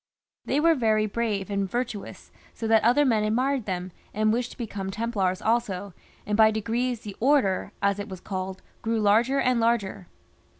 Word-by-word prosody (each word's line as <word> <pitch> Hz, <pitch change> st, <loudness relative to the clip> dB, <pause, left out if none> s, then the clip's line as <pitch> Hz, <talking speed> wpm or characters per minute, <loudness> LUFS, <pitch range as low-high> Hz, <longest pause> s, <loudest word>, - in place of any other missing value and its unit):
They 280 Hz, -, +1 dB
were 330 Hz, +2 st, +5 dB
very 220 Hz, -6 st, +2 dB
brave 210 Hz, -2 st, -2 dB
and 200 Hz, -1 st, -1 dB
virtuous, 240 Hz, -3 st, -5 dB, 0.2 s
so 225 Hz, -, -5 dB
that 220 Hz, -1 st, +4 dB
other 250 Hz, +6 st, +4 dB
men 225 Hz, -5 st, +2 dB
admired 250 Hz, +3 st, 0 dB
them, 180 Hz, -1 st, -3 dB, 0.2 s
and 215 Hz, 0 st, +2 dB
wished 245 Hz, +1 st, -1 dB
to -, -, -13 dB
become 200 Hz, -5 st, -4 dB
Templars 200 Hz, -3 st, -1 dB
also, 205 Hz, -4 st, 0 dB, 0.3 s
and 210 Hz, -, -1 dB
by 220 Hz, 0 st, +6 dB
degrees 230 Hz, +3 st, -1 dB
the 205 Hz, -2 st, -8 dB
" -, -, -34 dB
Order," 250 Hz, -7 st, +2 dB
as 200 Hz, 0 st, +2 dB
it 205 Hz, +1 st, -5 dB
was 190 Hz, -2 st, -7 dB
called, 190 Hz, 0 st, -5 dB, 0.2 s
grew 225 Hz, 0 st, 0 dB
larger 225 Hz, +6 st, +3 dB
and 255 Hz, -2 st, +2 dB
larger. 215 Hz, -5 st, 0 dB
220 Hz, 180 wpm, -26 LUFS, 200-235 Hz, 0.3 s, by